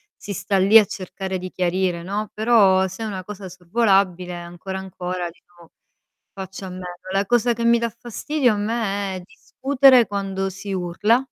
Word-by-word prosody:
si 200 - -7
sta 195 +2 -1
lì 200 +4 +7
a 210 - +3
cercare 190 0 -5
di 185 0 -7
chiarire, 180 -1 0
no, 205 +3 -4
però 205 -4 +4
se 190 +5 -7
è - - -2
una 190 -3 -5
cosa 200 -1 -8
sorvolabile 185 -1 +1
ancora, 175 +2 -7
ancora, 180 -2 -4
dico, 170 0 -20 0.6
faccio 190 0 -8
a - - -6
meno. 180 0 -8 0.3
La 195 +1 +1
cosa 240 +1 +3
che 235 +1 -4
mi 235 0 +5
dà 235 0 -1
fastidio 250 +1 0
a - - -2
me 205 -3 -2
è - - -8
discutere 260 +4 +3
quando 195 -1 -2
si 195 +1 -6
urla, 185 +5 +2
195 Hz, 175 wpm, -22 LUFS, 185-215 Hz, 0.6 s, lì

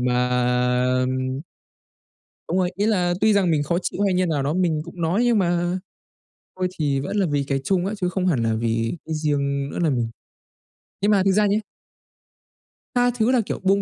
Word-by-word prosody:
mà, 125 0 +1 0.7
ừm 130 +1 -1 1.1
Đúng 175 - 0
rồi, 180 -1 +1
ý 205 +3 0
là 180 -5 +2
tuy 220 -1 +5
rằng 190 -4 +3
mình 145 -2 +2
khó 170 +4 0
chịu 200 - -3
hay 195 -2 +2
như 185 0 +2
nào 150 -5 0
đó 145 +3 0
mình 170 -4 +1
cũng 170 0 -9
nói, 180 +9 +1
nhưng 240 -2 +3
mà 175 0 +1 0.8
thôi 185 0 0
thì 140 -3 +1
vẫn 140 +9 -4
là 195 -3 +2
vì 145 -1 0
cái 135 - +1
chung 185 +1 +1
á, 205 - -2
chứ 180 - +1
không 185 +1 -1
hẳn 135 -10 +2
là 115 -1 +1
vì 115 +5 -1
cái 160 - -3
riêng 140 -2 -1
nữa - - -5
là 165 -3 +2
mình 120 -3 -1 0.9
Nhưng 205 - +3
mà 195 -2 +4
thực 195 - +3
ra 210 +2 +3
nhá 200 +1 +2 1.4
tha 245 0 +4
thứ 235 +2 +2
là, 250 -3 +3
kiểu, - - -4
buông 195 +1 +3
175 Hz, 210 wpm, -23 LUFS, 140-195 Hz, 1.4 s, tuy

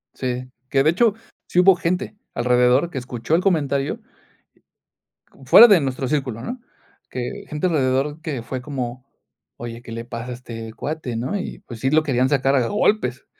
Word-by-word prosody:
Sí, 125 0 -3 0.2
que, 135 - +3
de 155 - +4
hecho, 215 +5 +3 0.3
sí 180 - +1
hubo 190 +1 +7
gente 180 +4 -2 0.2
alrededor 125 +5 +3
que 145 - -7
escuchó 125 +4 -2
el 175 - +2
comentario. 145 -7 0 1.3
Como 135 - -18
fuera 225 - +10
de 200 -7 +5
nuestro 130 -1 -2
círculo, 130 -5 -2
¿no? 245 - -5 0.5
Que 125 -1 -5
gente 150 +4 -1
alrededor 145 0 0
que 145 -7 -4
fue 130 +1 -5
como: 130 -2 -5 0.5
"Oye, 115 0 -7
¿qué 120 - -11
le 115 +1 -6
pasa 120 +1 -6
a - - -3
este 115 -2 -8
cuate, 145 -4 -4
no?" 130 - -2
Y, 190 - -6
pues, 120 -3 -11
sí 135 - +1
lo 155 +2 +3
querían 130 -3 +1
sacar 135 -1 +2
a 125 -4 +2
golpes. 205 - 0
130 Hz, 180 wpm, -22 LUFS, 125-155 Hz, 1.3 s, fuera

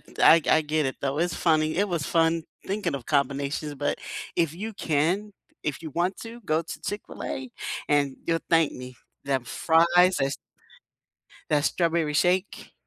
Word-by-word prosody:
th - - -20
I 165 +1 +8
I 160 - +5
get 155 -1 0
it 130 - -3
though. 140 +1 -1
It's 175 0 0
funny. 155 -1 +2
It 205 +1 +2
was 170 -4 -2
fun 165 -1 +2 0.2
thinking 200 -5 -1
of 135 -4 -5
combinations, 140 +1 -1
but 145 +1 -2 0.4
if 165 -2 +1
you 215 +5 -5
can 180 +4 0 0.3
if 150 +2 -3
you 160 - -6
want 175 +5 0
to 230 +1 -9
go 155 +2 +2
to - - -8
Chick-fil-A 130 -10 -5 0.4
and 140 -2 +2
you'll 165 -1 +1
thank 165 -2 +3
me. 125 -1 -9 0.3
Them 135 -3 0
fries 170 +6 +4
is 135 - -1 1.2
That 145 -1 +2
strawberry 165 -3 +1
shake. 180 +5 0
160 Hz, 165 wpm, -26 LUFS, 145-175 Hz, 1.2 s, I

